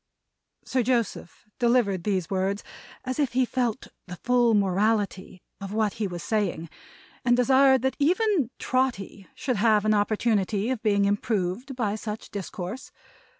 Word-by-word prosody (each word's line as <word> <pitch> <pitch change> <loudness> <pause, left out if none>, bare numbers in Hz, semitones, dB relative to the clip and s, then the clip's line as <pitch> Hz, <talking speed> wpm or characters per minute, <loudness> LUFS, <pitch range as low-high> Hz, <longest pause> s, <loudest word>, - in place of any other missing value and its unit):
Sir 260 - 0
Joseph 235 -6 -2
delivered 235 -7 +2
these 190 -5 0
words 195 +2 -1 0.4
as 255 +3 -3
if 275 -5 0
he 255 0 +3
felt 245 -3 -2 0.2
the 180 - -7
full 240 +2 +2
morality 200 -1 0 0.2
of 195 0 -6
what 215 -2 +1
he 205 - +1
was 175 -3 -6
saying, 185 -7 -2 0.5
and 240 0 +3
desired 265 0 +4
that 265 - 0
even 350 - +2
Trotty 240 -7 -2
should 255 -2 -2
have 215 0 +3
an 215 - +3
opportunity 210 0 +1
of 250 -4 -3
being 200 -2 +2
improved 205 +4 -1
by 215 -5 -1
such 215 0 -6
discourse. 195 +4 -6
215 Hz, 145 wpm, -26 LUFS, 200-250 Hz, 0.5 s, desired